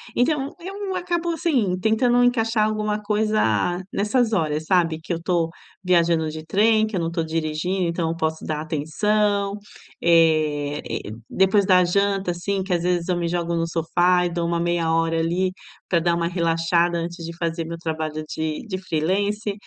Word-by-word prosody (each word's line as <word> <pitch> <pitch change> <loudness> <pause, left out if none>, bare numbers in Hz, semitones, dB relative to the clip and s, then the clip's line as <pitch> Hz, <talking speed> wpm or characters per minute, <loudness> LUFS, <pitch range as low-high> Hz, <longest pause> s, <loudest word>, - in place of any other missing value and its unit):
Então, 275 +2 +1
eu 385 +2 -5
acabo, 350 -1 -1
assim, 270 - 0
tentando 240 +4 +3
encaixar 225 -3 +2
alguma 215 -1 -1
coisa 210 - +1
nessas 225 +3 +1
horas, 155 -5 0
sabe, 165 -2 +2
que 175 - -3
eu 165 - -4
tô 170 -2 0 0.3
viajando 170 -3 +2
de 155 0 -7
trem, 215 +5 +3
que 215 - -5
eu - - 0
não 165 0 -2
tô 170 -1 -1
dirigindo, 160 +3 -1
então 170 -1 -1
eu 165 - -2
posso 160 -1 -2
dar 155 -1 -2
atenção. 200 +7 0 0.4
Eh, 155 -3 +2
e - - -4 0.2
depois 190 +1 +3
da 185 -2 +5
janta, 195 0 +1
assim, 190 +3 -2
que 190 -1 -2
às 175 - +1
vezes 175 -1 0
eu 180 - +1
me 170 -1 -1
jogo 170 0 -1
no 165 0 0
sofá 175 +2 +2
e - - 0
dou 170 0 -1
uma 170 0 0
meia 170 -1 0
hora 165 0 +1
ali 175 +3 0 0.4
para 170 - +2
dar 170 +1 +1
uma 170 0 0
relaxada 170 0 +1
antes 170 0 -5
de 170 0 -7
fazer 165 0 -2
meu 165 +1 -6
trabalho 155 -2 -3
de 155 +3 -4
de 185 -3 -3
freelancer. 200 +5 -1
175 Hz, 180 wpm, -23 LUFS, 165-205 Hz, 0.4 s, da